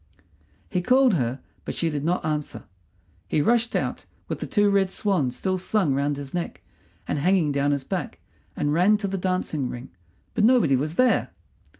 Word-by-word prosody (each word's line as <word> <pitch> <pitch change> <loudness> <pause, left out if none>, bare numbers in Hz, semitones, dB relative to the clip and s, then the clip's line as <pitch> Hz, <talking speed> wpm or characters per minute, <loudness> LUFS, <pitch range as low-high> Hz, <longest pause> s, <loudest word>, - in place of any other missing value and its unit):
He 180 - -1
called 255 +4 +4
her, 130 -4 -1 0.2
but - - -5
she 165 -1 0
did 145 -2 -3
not 175 +2 0
answer. 150 -1 -3 0.6
He - - +1
rushed 230 +8 +2
out, - - -2 0.2
with - - -4
the - - -4
two 205 -1 +3
red 195 -1 +3
swans 180 - 0
still 185 +6 -1
slung 185 -5 +1
round 140 +1 0
his 140 -1 -8
neck 175 -1 -4 0.4
and - - -1
hanging 175 -1 +2
down 140 0 +1
his 140 -2 0
back, - - -4 0.4
and 145 0 0
ran 185 +6 +4
to 205 -1 -3
the 195 0 -3
dancing 175 -7 -1
ring, 125 +2 -8 0.4
but 230 - +1
nobody 220 - +5
was 150 +5 -2
there. 255 +4 +3
170 Hz, 185 wpm, -25 LUFS, 145-200 Hz, 0.6 s, nobody